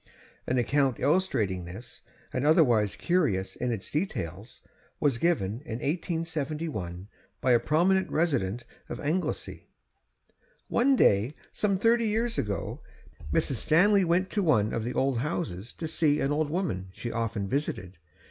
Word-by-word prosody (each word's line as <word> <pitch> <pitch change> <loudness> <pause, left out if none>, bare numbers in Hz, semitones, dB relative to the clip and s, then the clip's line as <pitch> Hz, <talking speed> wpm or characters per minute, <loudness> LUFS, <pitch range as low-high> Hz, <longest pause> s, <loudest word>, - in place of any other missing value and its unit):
An 130 - +1
account 135 0 +1
illustrating 125 - +1
this, 95 +8 -10 0.3
and 130 - -1
otherwise 125 - +4
curious 150 - 0
in 125 -1 -2
its 110 -5 -5
details, 105 - -4 0.4
was 140 -6 +1
given 120 - 0
in 135 -7 -6
1871 150 - -3 0.3
by 130 - +2
a 120 - +6
prominent 185 +7 +2
resident 120 - 0 0.2
of - - -5
Anglesea: 165 +6 -3 1.0
'One 265 +3 +3
day, 110 - +3 0.2
some 200 -2 +1
thirty 230 +3 +3
years 225 +2 0
ago, 100 -1 -3 0.5
Mrs. 120 - +1
Stanley 195 - +4
went 180 +2 +1
to 210 - 0
one 110 - +2
of 115 - -1
the 120 - -3
old 135 -3 +1
houses 120 - -3
to 160 - -5
see 155 -2 +2
an 135 - 0
old 150 0 0
woman 150 - -2
she 120 +5 -6
often 110 -3 -2
visited. 95 - -3
140 Hz, 140 wpm, -28 LUFS, 110-170 Hz, 1.0 s, a